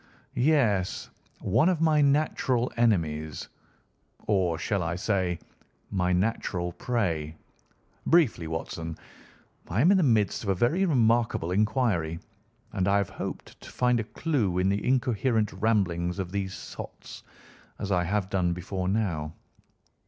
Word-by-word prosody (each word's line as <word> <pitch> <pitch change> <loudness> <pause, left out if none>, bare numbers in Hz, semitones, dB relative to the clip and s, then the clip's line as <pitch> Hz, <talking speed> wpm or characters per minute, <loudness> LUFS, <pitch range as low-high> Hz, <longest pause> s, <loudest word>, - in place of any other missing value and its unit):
"Yes; 120 -10 +1 0.3
one 165 - +3
of 180 -4 +1
my 155 -2 +3
natural 140 -4 +1
enemies, 80 - 0 0.8
or, 95 -5 +1
shall 95 +4 -1
I 85 0 -2
say, 95 -2 0 0.5
my 90 -1 +1
natural 90 -2 -1
prey. 85 -8 -2 0.7
Briefly, 145 - +3
Watson, 80 0 -5 0.7
I 90 +5 -1
am 165 +9 +5
in 200 - +5
the - - +3
midst 110 - +2
of 105 - -4
a 95 - +2
very 150 - +2
remarkable 115 - +2
inquiry, 105 -5 +1 0.6
and 95 -2 0
I 100 +1 +4
have 100 -2 -1
hoped - - -7
to - - -11
find 125 -1 +1
a - - -1
clue 110 - -1
in 90 +1 +2
the 100 +1 0
incoherent 120 -3 +1
ramblings 95 -4 0
of 95 -2 -4
these 95 -1 -3
sots, - - -9 0.6
as 100 - -4
I 90 -2 +2
have 100 +1 0
done 90 -3 +1
before 90 +1 -4
now. 85 -7 -1
100 Hz, 135 wpm, -27 LUFS, 90-120 Hz, 0.8 s, am